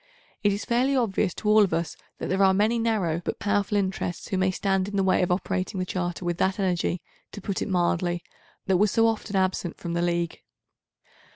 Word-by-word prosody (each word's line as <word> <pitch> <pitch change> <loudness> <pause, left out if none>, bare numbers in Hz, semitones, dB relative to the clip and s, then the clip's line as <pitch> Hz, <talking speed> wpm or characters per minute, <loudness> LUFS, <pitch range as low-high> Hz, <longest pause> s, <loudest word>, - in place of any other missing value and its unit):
It 205 - +4
is 200 +1 -3
fairly 255 +3 +2
obvious 220 -7 +1
to 215 - -5
all 215 +1 +6
of 185 -5 +1
us 165 0 -2 0.2
that - - -4
there 190 +1 0
are 190 -1 +5
many 220 +4 +2
narrow 200 -8 0
but - - -3
powerful 205 0 0
interests 190 -3 -2
who 195 - -1
may 190 0 +3
stand 190 0 0
in 205 - -5
the 195 - +2
way 190 - +3
of 180 - +1
operating 185 +1 -1
the 185 - -1
Charter 175 -1 -3
with 175 -1 -2
that 190 +2 +1
energy, 180 -2 0 0.3
to - - -6
put 200 -1 -3
it - - -2
mildly, 175 -1 0 0.4
that 190 -1 +3
was 210 +3 +3
so 225 +3 +3
often 220 -2 -1
absent 185 -2 0
from 170 - -5
the 170 - 0
League. 170 -1 -1
190 Hz, 215 wpm, -26 LUFS, 175-205 Hz, 0.4 s, all